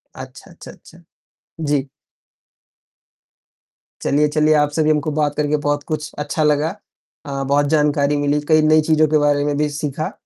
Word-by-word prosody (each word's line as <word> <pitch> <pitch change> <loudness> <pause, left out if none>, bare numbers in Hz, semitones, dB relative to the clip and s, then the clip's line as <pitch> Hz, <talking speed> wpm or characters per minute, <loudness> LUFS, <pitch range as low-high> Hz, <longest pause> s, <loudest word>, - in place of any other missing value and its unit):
अच्छा, - - -11
अच्छा, - - -12
अच्छा। - - -19 0.6
जी। 145 -3 -1 2.1
चलिए, 150 +2 +2
चलिए 155 +1 +2
आप 150 -1 +2
से 155 - +3
भी 155 - +1
हमको 150 0 -1
बात 145 -1 -1
करके 150 0 0
बहुत 145 0 -2
कुछ 155 0 -4
अच्छा 150 +2 -2
लगा, 150 +4 +1 0.5
अ, 140 -1 -4
बहुत 140 +2 +1
जानकारी 145 -1 +1
मिली, 145 +1 0
कई 155 0 +5
नई 155 0 +4
चीज़ों 155 0 +2
के 155 +1 +2
बारे 145 -1 +2
में 145 - -1
भी 150 0 0
सीखा। 145 +1 -4
150 Hz, 165 wpm, -19 LUFS, 145-155 Hz, 2.1 s, कई